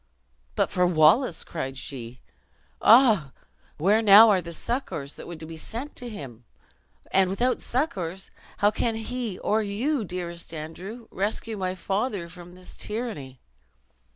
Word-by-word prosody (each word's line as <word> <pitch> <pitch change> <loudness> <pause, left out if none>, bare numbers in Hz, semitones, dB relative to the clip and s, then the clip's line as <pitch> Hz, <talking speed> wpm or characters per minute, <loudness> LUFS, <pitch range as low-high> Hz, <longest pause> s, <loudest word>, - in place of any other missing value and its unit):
"But - - +1
for 180 -1 +3
Wallace!" 170 - +4
cried 135 -5 -5
she, 125 -2 -7 0.6
"ah, 220 - +6 0.4
where 200 +8 +3
are - - +1
now 210 -2 +8
the 170 0 -8
succors 165 - -4
that - - -10
were 175 - -6
to 160 0 -7
be 160 0 -9
sent 240 - -7
to 245 - -5
him! 130 - -9 0.7
And 190 -1 +4
without 245 +7 0
succors, 190 - -2 0.3
how 205 +1 +3
can 225 +1 -1
he, 225 -2 -4
or 215 +1 +1
you, 225 +7 -1
dearest 170 -3 -5
Andrew, 185 +9 -8
rescue 215 +3 -2
my 185 -2 -2
father 195 0 -2
from 175 +1 -12
this 185 0 -10
tyranny!" 210 - -5
190 Hz, 145 wpm, -26 LUFS, 165-225 Hz, 0.7 s, now